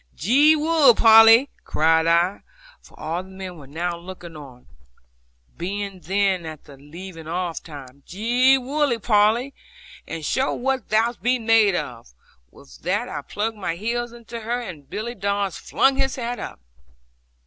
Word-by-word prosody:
'Gee 280 - +4
wug, 305 -5 +4
Polly!' 225 +3 +7 0.2
cried 160 +1 +2
I, 170 +4 +2 0.4
for - - -19
all 165 +3 -3
the 185 - -14
men 190 -2 -8
were 140 - -13
now 170 +5 -3
looking 175 -2 -10
on, 130 -5 -12 0.9
being 195 +2 -5
then 190 +1 0
at 155 -2 -9
the 140 - -14
leaving 165 +4 -11
off 175 0 -3
time: 140 -3 -12
'Gee 245 +7 +3
wug, 265 -3 -1
Polly, 225 +5 +2 0.5
and 160 -2 -6
show 265 - 0
what 265 -1 -2
thou 225 +3 +2
be'est 250 +1 +1
made 220 -4 +4
of.' 115 - -6 0.3
With 65 +1 -17
that - - -1
I - - -5
plugged 220 +1 -4
my 185 -4 -3
heels 235 +5 -3
into 235 0 -9
her, 235 +2 -3
and 160 - -9
Billy 225 +6 -5
Dadds 200 -2 -2
flung 270 0 +1
his 265 -1 0
hat 245 -1 -4
up. - - -8
200 Hz, 155 wpm, -22 LUFS, 170-240 Hz, 0.9 s, Polly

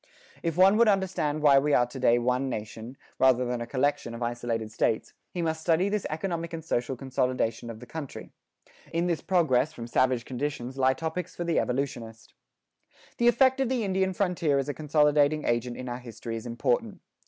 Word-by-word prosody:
If 165 -1 -2
one 190 +3 +6
would 235 0 +5
understand 180 -7 0
why 140 -2 +7
we 145 +1 +2
are 120 - +4
to 125 +2 -9
day 120 -2 +4
one 125 +2 0
nation, 110 +3 -6 0.2
rather 125 -1 +4
than 120 -1 -2
a 120 - -4
collection 130 -3 -1
of 120 - -5
isolated 120 -2 -3
states, 110 0 -1 0.2
he 175 - -3
must 160 -1 -1
study 170 +4 +2
this 210 -1 -1
economic 170 +1 -3
and 160 -1 -6
social 125 -3 -1
consolidation 125 -3 -1
of 110 -1 -8
the 125 - -10
country. 150 0 -8 0.6
In 170 +1 0
this 170 -2 0
progress 155 -6 +2
from 115 - -7
savage 125 0 +1
conditions 130 -1 -4
lie 130 0 +3
topics 165 +4 -4
for 175 - -3
the 170 -1 +1
evolutionist.[15:1] 120 -4 -7
The 240 - +3
effect 260 +2 +4
of 265 -3 +1
the 255 -3 0
Indian 190 -1 +1
frontier 175 -7 +1
as 135 0 -1
a 145 - -2
consolidating 150 +1 +2
agent 120 +1 -1
in 130 - -6
our 120 0 -4
history 115 -1 -7
is 115 +2 -6
important. 120 +1 -1
140 Hz, 190 wpm, -27 LUFS, 120-165 Hz, 0.6 s, why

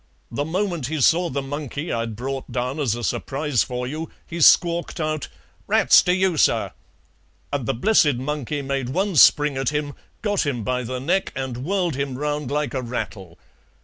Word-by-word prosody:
The 140 +5 -2
moment 175 -4 -2
he 155 +1 -3
saw 170 +6 +3
the 140 +1 -3
monkey 145 +2 -4
I'd 115 -1 -2
brought 135 +3 -5
down 125 +4 -2
as 125 -7 +1
a 120 - -6
surprise 135 +2 -1
for 125 0 -2
you 155 +5 -5 0.2
he 170 0 -6
squawked 170 +2 +4
out 155 -2 -2 0.4
'Rats - - +6
to 180 - +1
you, 185 -3 +1
sir!' - - +2 0.8
and 135 -5 -2
the - - 0
blessed 150 - +3
monkey 145 +2 -3
made 135 -2 -2
one 190 +6 -1
spring 145 0 +6
at 135 -1 0
him, 150 -1 -2 0.3
got 205 -3 +1
him 130 -7 -2
by 125 +3 -1
the 125 +1 -4
neck 180 +9 0
and 130 -2 -4
whirled 180 0 0
him 140 -2 -3
round 150 -1 -2
like 150 0 -1
a 130 - -1
rattle. 100 -7 -6
145 Hz, 180 wpm, -23 LUFS, 125-160 Hz, 0.8 s, Rats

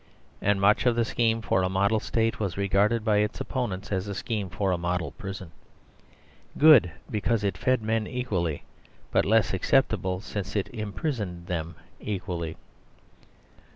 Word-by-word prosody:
And 105 -1 +2
much 105 +5 +4
of 120 - +4
the 115 -1 +2
scheme 115 -1 +1
for 95 - +2
a 90 - +1
model 100 +3 +2
State 115 +1 0
was 95 -4 -2
regarded 100 +3 +2
by 105 -2 +3
its 105 +1 0
opponents 105 -8 -3
as 95 0 -1
a 100 - -4
scheme 105 -1 -3
for 95 +2 -1
a - - +2
model 85 -3 -1
prison; 95 -3 -8 1.1
good 150 - +7 0.2
because 110 0 0
it 100 -3 0
fed 130 +6 +1
men 110 0 0
equally, 95 - -2 0.5
but - - +3
less 110 0 +3
acceptable 95 -3 +1
since 100 0 -5
it 100 - -1
imprisoned 105 - -4
them 85 -2 -4 0.2
equally. 90 -5 -4
100 Hz, 155 wpm, -27 LUFS, 90-110 Hz, 1.1 s, good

